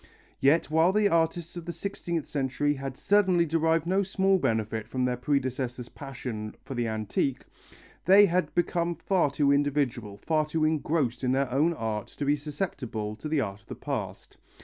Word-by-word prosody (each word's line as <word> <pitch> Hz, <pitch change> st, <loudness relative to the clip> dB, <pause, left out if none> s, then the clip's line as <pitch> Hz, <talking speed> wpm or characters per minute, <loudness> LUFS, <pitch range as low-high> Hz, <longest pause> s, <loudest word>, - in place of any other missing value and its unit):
Yet 150 Hz, +4 st, +3 dB
while 160 Hz, +3 st, +4 dB
the 210 Hz, +1 st, +3 dB
artists 165 Hz, 0 st, 0 dB
of 175 Hz, -2 st, -7 dB
the 170 Hz, -, -3 dB
sixteenth 170 Hz, -2 st, -4 dB
century 145 Hz, +1 st, 0 dB
had 135 Hz, -1 st, -6 dB
certainly 190 Hz, -4 st, +3 dB
derived 165 Hz, 0 st, +1 dB
no 190 Hz, +3 st, +2 dB
small 195 Hz, 0 st, +2 dB
benefit 110 Hz, -5 st, -1 dB
from 130 Hz, -1 st, -1 dB
their 125 Hz, 0 st, 0 dB
predecessors' 125 Hz, -2 st, -2 dB
passion 125 Hz, -6 st, -6 dB
for -, -, -6 dB
the 120 Hz, -2 st, -1 dB
antique, 110 Hz, +4 st, -1 dB, 0.6 s
they 195 Hz, +4 st, +8 dB
had 180 Hz, -1 st, 0 dB
become 170 Hz, 0 st, 0 dB
far 175 Hz, -1 st, +1 dB
too 140 Hz, 0 st, +2 dB
individual, 140 Hz, -7 st, 0 dB
far 155 Hz, +7 st, 0 dB
too 155 Hz, 0 st, 0 dB
engrossed 150 Hz, -5 st, 0 dB
in 125 Hz, 0 st, +2 dB
their 135 Hz, -1 st, 0 dB
own 150 Hz, +6 st, +2 dB
art 110 Hz, -5 st, -3 dB
to 145 Hz, -, -2 dB
be 145 Hz, +1 st, +3 dB
susceptible 140 Hz, -, -4 dB
to 155 Hz, -, -6 dB
the 150 Hz, -2 st, +2 dB
art 100 Hz, -3 st, -4 dB
of -, -, -31 dB
the -, -, -6 dB
past. -, -, -5 dB
145 Hz, 175 wpm, -28 LUFS, 125-170 Hz, 0.6 s, they